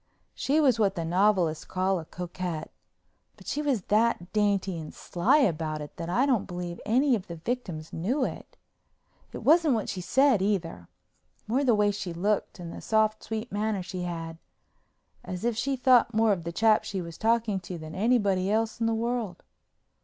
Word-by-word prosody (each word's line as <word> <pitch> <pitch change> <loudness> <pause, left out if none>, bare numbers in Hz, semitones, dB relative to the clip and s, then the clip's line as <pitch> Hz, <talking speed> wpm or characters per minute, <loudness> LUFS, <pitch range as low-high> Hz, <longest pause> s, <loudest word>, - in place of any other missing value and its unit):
She 290 +3 +1
was 260 -7 +3
what 200 -2 +2
the 165 -2 -3
novelists 180 -2 +2
call 185 0 0
a 160 - -8
coquette, 175 -2 -5 0.7
but - - -16
she 295 - -2
was 270 -10 0
that 210 -4 +1
dainty 200 -4 +1
and 155 - -7
sly 175 +11 +1
about 160 - 0
it 150 -1 -8
that 165 - -5
I 240 +10 +2
don't 250 -8 +1
believe 175 -2 -6
any 260 +5 +3
of 200 - -6
the 170 - -6
victims 165 -5 -5
knew 250 - 0
it. - - -8 0.7
It - - -7
wasn't 315 -3 +5
what 220 - -2
she 185 - -4
said, 260 +4 +3
either; 175 - -2 0.6
more 255 +6 +1
the 245 -5 +4
way 210 0 +3
she 195 -3 -5
looked 200 +4 -1
and 170 -2 -7
the - - -8
soft, 215 -1 +1
sweet 220 +2 -5
manner 205 -2 -1
she 180 0 -6
had, 165 -2 -5 0.8
as 180 +4 -5
if 240 -1 +1
she 270 +4 -1
thought 250 -3 +4
more 220 0 +4
of 175 -4 -1
the 170 - -3
chap 220 +4 +3
she 195 - -4
was 170 -2 -7
talking 225 -2 +1
to 180 -1 -7
than 155 0 -9
anybody 200 -3 +2
else 220 +2 0
in 230 - +1
the 225 - +1
world. 230 -5 -3
200 Hz, 190 wpm, -27 LUFS, 175-230 Hz, 0.8 s, wasn't